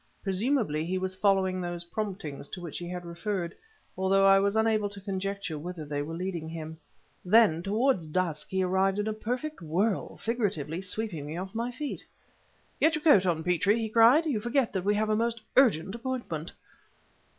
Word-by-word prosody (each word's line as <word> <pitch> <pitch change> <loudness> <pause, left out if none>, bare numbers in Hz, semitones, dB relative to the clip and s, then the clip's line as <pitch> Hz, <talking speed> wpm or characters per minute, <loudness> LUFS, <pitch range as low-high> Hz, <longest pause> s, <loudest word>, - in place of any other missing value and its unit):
Presumably 195 - 0
he 180 +3 -1
was 185 0 -2
following 190 -2 +2
those 175 -1 -4
"promptings" 170 -7 -5
to - - -6
which 170 -4 -6
he 175 0 -6
had 180 -1 -5
referred, 170 0 -3 0.4
though 195 +1 +3
I 195 0 +7
was 200 +1 +1
unable 220 -2 +2
to 200 0 -10
conjecture 195 -4 -3
whither 170 0 -6
they 145 0 -2
were 160 +3 -5
leading 175 -2 -4
him. 160 -1 -7 0.4
Then, 190 -4 +5
towards 205 - +1
dusk 165 -1 -2
he 190 0 0
arrived 190 +1 +2
in 210 - 0
a 215 - 0
perfect 250 +6 -4
whirl, 185 +6 -1
figuratively 195 - -2
sweeping 190 -6 -4
me 155 +3 -5
off 190 +1 -5
my 230 +2 -2
feet. 285 +4 -5 0.8
"Get 315 0 +4
your 305 - -4
coat 200 - +6
on, 160 -2 0
Petrie!" 180 +5 +2
he 225 -1 -2
cried; 235 +9 +6
"you 275 -9 0
forget 240 +2 0
that 190 -2 -2
we 205 +1 +3
have 215 +1 +1
a - - +3
most 230 +1 0 0.2
urgent 195 - +4
appointment!" 235 -10 -4
195 Hz, 185 wpm, -28 LUFS, 170-220 Hz, 0.8 s, I